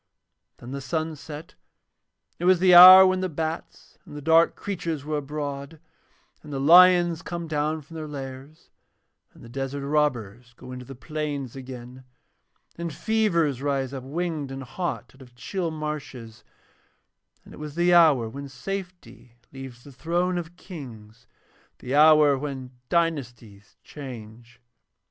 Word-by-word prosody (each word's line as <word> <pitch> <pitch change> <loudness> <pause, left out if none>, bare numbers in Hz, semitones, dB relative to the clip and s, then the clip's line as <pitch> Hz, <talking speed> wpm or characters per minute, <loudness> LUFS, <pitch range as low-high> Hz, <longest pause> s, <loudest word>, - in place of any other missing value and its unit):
Then 120 +1 -11
the 140 0 -5
sun 160 +3 -3
set, 150 +1 -10 0.8
and - - -50
it 175 - -3
was 185 0 +5
the 180 +1 +4
hour 185 +2 +11
when 185 0 +1
the 185 0 -2
bats 160 +1 -6
and - - -13
the 145 - -7
dark 165 +2 +4
creatures 165 -7 -4
are 150 +1 -3
abroad 145 +1 -6 0.6
and 150 - -12
the 135 - -3
lions 175 +2 +6
come 170 -1 -6
down 155 0 -2
from 165 - -17
their 155 -1 -6
lairs, 135 +2 -10 0.6
and - - -18
the - - -11
desert 135 +3 -5
robbers 125 -6 -1
go 125 - -12
into 125 0 -8
the 135 - -10
plains 145 -2 -5
again, 130 -1 -10 0.8
and 170 -1 -4
fevers 170 - 0
rise 140 -2 -2
up 135 - -5
winged 155 0 -4
and 135 0 -6
hot 175 +8 -5
out 135 - -19
of 125 -2 -16
chill 170 - -4
marshes, 150 -7 -7 1.0
and - - -14
it - - -12
was 150 -1 -8
the 175 +1 +2
hour 155 -9 +5
when 140 +5 -8
safety 180 -3 -8 0.2
leaves 130 -3 -10
the 140 - -13
thrones 175 +6 -1
of 170 0 -9
Kings, 120 - -12 0.5
the 125 - -6
hour 150 -1 +6
when 135 -3 -6 0.2
dynasties 125 - -3
change. 120 -4 -11
145 Hz, 150 wpm, -25 LUFS, 130-165 Hz, 1.0 s, hour